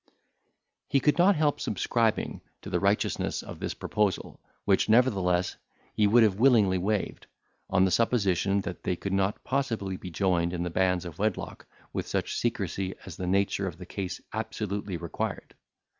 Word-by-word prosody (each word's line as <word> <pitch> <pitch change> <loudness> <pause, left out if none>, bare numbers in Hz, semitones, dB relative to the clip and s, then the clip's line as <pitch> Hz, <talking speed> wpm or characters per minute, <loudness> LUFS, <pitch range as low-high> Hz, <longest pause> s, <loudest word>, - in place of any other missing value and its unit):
He 140 - +3
could 150 +5 +2
not 190 +3 +6
help 150 -2 +1
subscribing 115 -3 0 0.2
to - - -7
the - - +1
righteousness - - 0
of - - -9
this - - -3
proposal, 105 -3 -1 0.3
which, 100 +1 +3
nevertheless, 95 -7 +3 0.4
he 105 - +3
would 115 +3 +6
have 105 -2 +2
willingly 110 -8 +5
waived, 100 +2 -2 0.4
on 95 - +4
the 95 - +1
supposition 100 -3 +2
that 90 -2 -6
they 90 - -1
could 95 +2 -4
not 95 +2 0
possibly 115 -9 -1
be 90 - -8
joined 90 -1 +1
in 85 -1 -2
the 90 - -3
bands 90 0 +1
of 85 +1 -8
wedlock 105 -2 -2 0.3
with - - -3
such - - -2
secrecy 95 -1 -2
as 95 - -8
the 90 - -4
nature 100 +1 +1
of 85 -3 -6
the 90 - -9
case 95 0 -5
absolutely 100 -3 -3
required. 85 -2 -4
95 Hz, 165 wpm, -28 LUFS, 90-110 Hz, 0.4 s, not